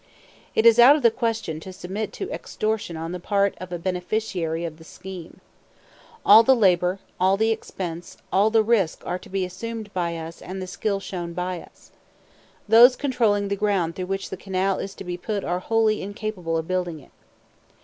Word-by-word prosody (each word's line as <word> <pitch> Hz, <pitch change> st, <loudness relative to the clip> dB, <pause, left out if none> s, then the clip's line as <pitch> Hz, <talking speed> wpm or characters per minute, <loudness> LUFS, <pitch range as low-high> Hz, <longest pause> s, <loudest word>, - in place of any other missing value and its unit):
It 220 Hz, -, +2 dB
is 230 Hz, 0 st, +7 dB
out 255 Hz, +5 st, +9 dB
of 300 Hz, -, -3 dB
the 235 Hz, -, +6 dB
question 225 Hz, -9 st, -2 dB
to 190 Hz, +4 st, -9 dB
submit 195 Hz, +3 st, -5 dB
to 390 Hz, -, -5 dB
extortion 215 Hz, -6 st, -3 dB
on 165 Hz, +1 st, -5 dB
the 180 Hz, -, -5 dB
part 200 Hz, +2 st, +1 dB
of 185 Hz, -1 st, -7 dB
a 175 Hz, -, -2 dB
beneficiary 180 Hz, -2 st, -2 dB
of 160 Hz, -2 st, -6 dB
the 160 Hz, -, -14 dB
scheme. 180 Hz, 0 st, -10 dB, 0.8 s
All 215 Hz, +2 st, +9 dB
the 265 Hz, +3 st, +5 dB
labor, 180 Hz, -4 st, +3 dB, 0.2 s
all 190 Hz, +2 st, +3 dB
the 220 Hz, +2 st, +2 dB
expense, 175 Hz, -6 st, -5 dB, 0.2 s
all 200 Hz, +3 st, +4 dB
the 220 Hz, 0 st, +4 dB
risk 210 Hz, -7 st, +1 dB
are 180 Hz, -, -2 dB
to -, -, -14 dB
be 190 Hz, -1 st, -1 dB
assumed 215 Hz, +3 st, -7 dB
by 170 Hz, -2 st, -1 dB
us 165 Hz, +1 st, -8 dB
and 185 Hz, -, -7 dB
all -, -, -5 dB
the -, -, -4 dB
skill 200 Hz, +2 st, -2 dB
shown 175 Hz, -3 st, -6 dB
by 180 Hz, 0 st, -3 dB
us. -, -, -19 dB, 0.8 s
Those 235 Hz, +4 st, +8 dB
controlling 220 Hz, -7 st, +1 dB
the 200 Hz, -, 0 dB
ground 195 Hz, -5 st, 0 dB
through 185 Hz, -1 st, -4 dB
which 195 Hz, 0 st, -3 dB
the 190 Hz, -, -4 dB
canal 190 Hz, 0 st, -1 dB
is 195 Hz, 0 st, -6 dB
to -, -, -8 dB
be 175 Hz, -1 st, -4 dB
put 205 Hz, +2 st, -3 dB
are 175 Hz, +1 st, -1 dB
wholly 220 Hz, +1 st, +1 dB
incapable 200 Hz, -5 st, -3 dB
of 160 Hz, 0 st, -3 dB
building 180 Hz, -3 st, -2 dB
it. 135 Hz, -, -19 dB
190 Hz, 200 wpm, -24 LUFS, 175-220 Hz, 0.8 s, out